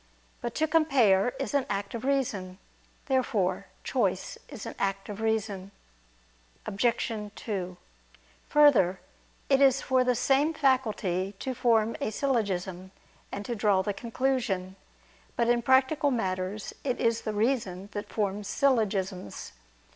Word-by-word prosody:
But 235 -1 -4
to 315 - +2
compare 255 - +3
is 275 - -3
an 280 -2 +1
act 200 0 -3
of 235 - -5
reason. 220 -10 -1 0.5
Therefore 200 -9 0 0.2
choice 195 -8 -1
is 265 -8 -8
an - - -5
act 195 0 -2
of 205 +1 -6
reason. 215 -4 -1 1.0
Obj. 235 +4 0 0.2
2: 185 -5 -4 0.7
Further, 255 -12 +5 0.5
it 270 0 +3
is 270 -1 +5
for 260 -1 +3
the 250 -1 +2
same 280 +6 +2
faculty 215 - +1
to 260 +5 -3
form 230 -2 +2
a - - 0
syllogism, 195 -7 -1 0.4
and 200 +1 -5
to 240 - -2
draw 205 -4 +2
the 205 - -1
conclusion. 230 -6 -1 0.6
But, 235 0 +1
in 240 0 +3
practical 265 +4 +3
matters, 195 -4 -2
it 255 -3 -1
is 230 0 +1
the 215 - -3
reason 205 -5 -1
that 205 0 -5
forms 205 -1 -2
syllogisms. 200 - 0
220 Hz, 130 wpm, -28 LUFS, 195-260 Hz, 1.0 s, Further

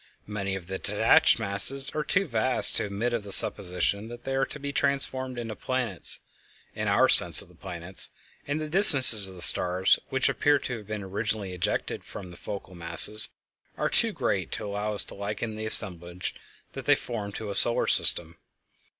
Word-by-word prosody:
Many 100 -2 -6
of 95 -3 -10
the 95 +1 -7
detached - - +1
masses 115 +8 -5
are 155 - -5
too 195 +5 0
vast 125 -2 -2
to - - -2
admit 105 +4 -5
of 120 - -3
the 100 -1 -12
supposition 100 +2 +2
that 120 +1 -13
they 135 - -6
are 135 0 -2
to 150 - -10
be 140 0 -7
transformed 130 -3 -3
into 115 -2 -7
planets, 125 -8 -2 0.5
in - - -6
our - - +2
sense - - +6
of - - -19
planets, 90 0 +1 0.4
and 145 +2 -4
the 155 - -6
distances 135 - +7
of 95 - -12
the 90 - -1
stars 90 +2 +2
which 130 -1 -1
appear 145 0 0
to 125 -3 -7
have 105 -3 -15
been 105 -1 -7
originally 100 0 -6
ejected 90 -1 -5
from 90 -3 -12
the - - -14
focal 100 -2 -10
masses 85 +5 -1 0.5
are - - -3
too - - +4
great - - -4
to - - -6
allow 105 +1 -5
us 100 - +1
to - - -9
liken 105 +2 -7
the 110 0 -8
assemblage 90 -5 +5 0.4
that - - -10
they - - +3
form 105 -4 -8
to 105 -1 -8
a - - -6
solar 120 +3 +2
system. 85 -1 +1
105 Hz, 190 wpm, -24 LUFS, 95-130 Hz, 0.5 s, distances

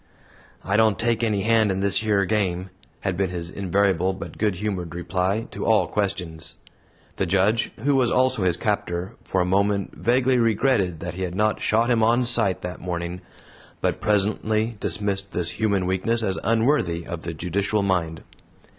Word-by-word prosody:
"I 100 +2 +1
don't 110 -2 +4
take 115 0 0
any 105 -3 +1
hand 110 -1 +3
in 95 - -2
this 100 +2 +1
yer 105 -3 +2
game," 95 -2 -1 0.3
had 100 -2 -1
been 95 0 0
his 85 -1 -5
invariable 95 -1 +1
but 85 -3 -9
good 105 -3 +1
humored 90 -4 -4
reply 90 +5 -1
to - - -5
all 110 -2 +3
questions. 90 -6 -3 0.6
The 95 - 0
Judge 100 +5 +2
who 140 0 +2
was 125 -3 +3
also 130 -2 +2
his 90 -2 +2
captor 95 -2 -2
for 95 - 0
a - - +1
moment 100 +1 0
vaguely 125 +7 +2
regretted 110 - +1
that 90 0 -4
he 95 - -7
had 90 -1 -3
not 105 +2 +1
shot 115 +3 +2
him 115 -2 +3
"on 120 +3 +3
sight" 115 -5 +1
that 90 0 -6
morning, 85 0 -4 0.6
but - - -1
presently 110 +2 +1
dismissed 100 -2 -1
this 85 -1 -1
human 100 -4 0
weakness 105 +6 0
as 95 -3 -1
unworthy 115 - +1
of 85 -1 -6
the 85 -1 -5
judicial 100 +5 -1
mind. 85 -4 -1
100 Hz, 170 wpm, -23 LUFS, 90-110 Hz, 0.6 s, don't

